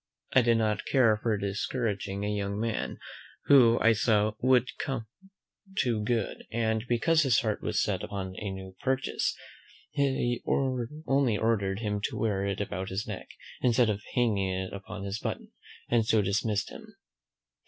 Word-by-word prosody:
I 130 Hz, -, +7 dB
did 115 Hz, -1 st, +3 dB
not 105 Hz, -1 st, 0 dB
care 120 Hz, -5 st, +4 dB
for 110 Hz, -3 st, +1 dB
discouraging 100 Hz, -1 st, -2 dB
a 105 Hz, 0 st, -1 dB
young 100 Hz, 0 st, -2 dB
man, 115 Hz, 0 st, -2 dB, 0.5 s
who, 120 Hz, -5 st, +7 dB
I 115 Hz, -, +6 dB
saw, 110 Hz, -1 st, +2 dB
would 130 Hz, +1 st, +3 dB
come 130 Hz, -5 st, -3 dB, 0.7 s
to 115 Hz, -5 st, +1 dB
good; 115 Hz, -2 st, -2 dB
and, 110 Hz, -1 st, 0 dB
because 155 Hz, +7 st, +3 dB
his 135 Hz, -6 st, +3 dB
heart 110 Hz, -3 st, -1 dB
was -, -, 0 dB
set -, -, -1 dB
upon 95 Hz, -2 st, -4 dB
his 95 Hz, +2 st, -5 dB
new 95 Hz, -1 st, -8 dB
purchase, 135 Hz, 0 st, 0 dB, 0.6 s
I 130 Hz, -4 st, +1 dB, 0.7 s
only 135 Hz, -5 st, +2 dB
ordered 105 Hz, -3 st, 0 dB
him 105 Hz, -2 st, -1 dB
to -, -, -3 dB
wear 100 Hz, -3 st, 0 dB
it 100 Hz, -1 st, -2 dB
about 95 Hz, -2 st, -3 dB
his 95 Hz, +2 st, -3 dB
neck, -, -, -6 dB, 0.3 s
instead 120 Hz, -2 st, +3 dB
of 105 Hz, 0 st, -4 dB
hanging 105 Hz, -6 st, +2 dB
it 95 Hz, 0 st, -3 dB
upon 100 Hz, +1 st, -7 dB
his 100 Hz, +2 st, -3 dB
button, -, -, -5 dB, 0.4 s
and 120 Hz, -1 st, +3 dB
so 110 Hz, -1 st, +3 dB
dismissed 100 Hz, +1 st, 0 dB
him. 220 Hz, -2 st, -12 dB
110 Hz, 160 wpm, -29 LUFS, 100-120 Hz, 0.7 s, I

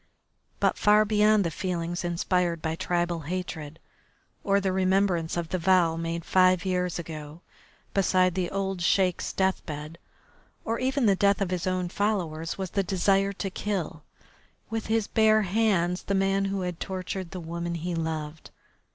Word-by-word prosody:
But -, -, +1 dB
far 210 Hz, +1 st, +5 dB
beyond 210 Hz, 0 st, +4 dB
the 170 Hz, -, -2 dB
feelings 175 Hz, 0 st, -3 dB
inspired 175 Hz, 0 st, 0 dB
by 160 Hz, 0 st, -2 dB
tribal 175 Hz, -1 st, -1 dB
hatred 160 Hz, -2 st, -5 dB, 0.7 s
or 200 Hz, 0 st, +3 dB
the 190 Hz, -1 st, 0 dB
remembrance 185 Hz, -3 st, +1 dB
of 170 Hz, -2 st, -3 dB
the 185 Hz, -, -1 dB
vow 175 Hz, -2 st, +3 dB
made 165 Hz, 0 st, -3 dB
five 185 Hz, -1 st, +4 dB
years 180 Hz, -1 st, 0 dB
ago 155 Hz, -1 st, -8 dB, 0.5 s
beside 185 Hz, -2 st, +3 dB
the 180 Hz, -1 st, -1 dB
old 195 Hz, -2 st, -2 dB
Sheik's 180 Hz, 0 st, +1 dB
deathbed, 165 Hz, -4 st, -2 dB, 0.7 s
or 230 Hz, +1 st, -1 dB
even 265 Hz, 0 st, +1 dB
the 200 Hz, -2 st, +5 dB
death 200 Hz, +1 st, +3 dB
of 195 Hz, -3 st, -1 dB
his 180 Hz, +1 st, -2 dB
own 185 Hz, -1 st, 0 dB
followers, 175 Hz, -5 st, -2 dB
was 190 Hz, -2 st, -4 dB
the 200 Hz, -, +1 dB
desire 195 Hz, +1 st, +2 dB
to 195 Hz, 0 st, -4 dB
kill, 185 Hz, -6 st, -3 dB, 0.7 s
with 225 Hz, -1 st, -3 dB
his 225 Hz, -1 st, +1 dB
bare 220 Hz, 0 st, +3 dB
hands, 190 Hz, -3 st, +1 dB
the 200 Hz, -, -2 dB
man 195 Hz, 0 st, +2 dB
who 195 Hz, 0 st, -2 dB
had 180 Hz, -2 st, -4 dB
tortured 185 Hz, -1 st, -4 dB
the 185 Hz, -, -6 dB
woman 170 Hz, +1 st, -4 dB
he 170 Hz, +2 st, -3 dB
loved. 160 Hz, -1 st, -4 dB
185 Hz, 160 wpm, -27 LUFS, 170-195 Hz, 0.7 s, far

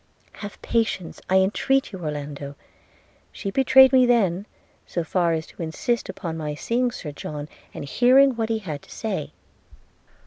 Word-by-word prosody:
'Have 205 Hz, -1 st, -9 dB
patience, 220 Hz, -7 st, -1 dB
I 190 Hz, 0 st, +5 dB
entreat 265 Hz, +8 st, +1 dB
you, 190 Hz, -, -7 dB
Orlando! 145 Hz, -2 st, -5 dB, 0.4 s
– -, -, -31 dB, 0.3 s
She 195 Hz, -, -5 dB
betrayed 265 Hz, +2 st, +6 dB
me 255 Hz, -1 st, +6 dB
then, 200 Hz, -5 st, +2 dB, 0.4 s
so 170 Hz, -, -2 dB
far 170 Hz, 0 st, +1 dB
as 160 Hz, -1 st, -2 dB
to -, -, -12 dB
insist 190 Hz, +9 st, -2 dB
upon 170 Hz, -4 st, -5 dB
my 150 Hz, -2 st, -4 dB
seeing 245 Hz, +10 st, 0 dB
Sir 165 Hz, -9 st, -7 dB
John, 145 Hz, 0 st, -6 dB, 0.2 s
and -, -, -7 dB
hearing 255 Hz, -, +5 dB
what 225 Hz, -1 st, -2 dB
he 225 Hz, -, +1 dB
had 160 Hz, -9 st, -6 dB
to -, -, -20 dB
say.' 215 Hz, -3 st, -4 dB
190 Hz, 165 wpm, -24 LUFS, 160-240 Hz, 0.4 s, betrayed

